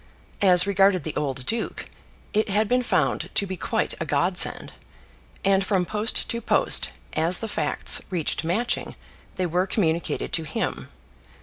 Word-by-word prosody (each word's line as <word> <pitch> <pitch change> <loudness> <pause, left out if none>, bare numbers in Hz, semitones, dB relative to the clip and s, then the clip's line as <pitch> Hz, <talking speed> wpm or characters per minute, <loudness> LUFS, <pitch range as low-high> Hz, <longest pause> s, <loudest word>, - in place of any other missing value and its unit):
As 180 -2 +6
regarded 195 -3 +3
the 155 - -5
old 135 -3 -2
duke, 225 +1 -2 0.5
it 215 0 +1
had 210 +2 +1
been 250 +3 +2
found 245 - 0
to 200 - +2
be 190 -1 -5
quite - - -1
a - - -2
godsend; - - 0 0.7
and 195 0 +3
from 190 -2 +1
post 215 +5 0
to 235 -1 -2
post - - +2 0.2
as 165 +3 +2
the 225 - -4
facts 155 -8 +1
reached 175 -3 -1
Matching 200 +9 -2 0.4
they 185 - -1
were 180 +2 0
communicated 170 -5 -1
to 165 - +1
him. 155 - -4
190 Hz, 150 wpm, -24 LUFS, 170-210 Hz, 0.7 s, As